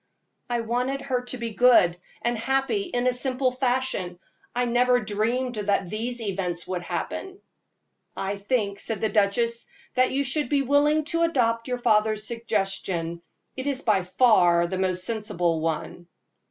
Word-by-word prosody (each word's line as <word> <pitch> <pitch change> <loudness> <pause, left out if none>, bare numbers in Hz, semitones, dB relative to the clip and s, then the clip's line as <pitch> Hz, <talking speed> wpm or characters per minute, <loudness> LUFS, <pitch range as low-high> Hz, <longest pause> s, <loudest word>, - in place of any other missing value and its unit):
"I 240 -1 0
wanted 250 +4 -1
her 255 -2 -2
to 255 - -2
be 235 -1 -4
good 215 -6 +5 0.3
and 240 0 +1
happy 270 - 0
in 245 -9 -2
a 255 - +3
simple 255 0 0
fashion. 250 -8 -1 0.4
I 245 0 +1
never 245 +1 +3
dreamed 230 +4 -1
that 200 -3 0
these 240 +3 -3
events 185 -5 -3
would 180 -1 -3
happen." 380 - -4 0.8
"I 195 +1 -2
think," 200 -1 -1
said 220 -1 -3
the 220 - 0
duchess, 220 +3 +1 0.3
"that 255 0 +3
you 275 +1 +1
should 280 0 -1
be 280 -2 +2
willing 290 +3 +3
to 335 - +1
adopt 230 -8 +1
your 250 -1 -1
father's 215 -2 +2
suggestion. 195 -7 -2 0.3
It 260 +1 -4
is 275 -1 -1
by 210 -4 +3
far 180 -3 +4
the 185 +2 -3
most 185 -1 0
sensible 205 -7 -1
one." 165 +2 -3
230 Hz, 155 wpm, -25 LUFS, 195-255 Hz, 0.8 s, good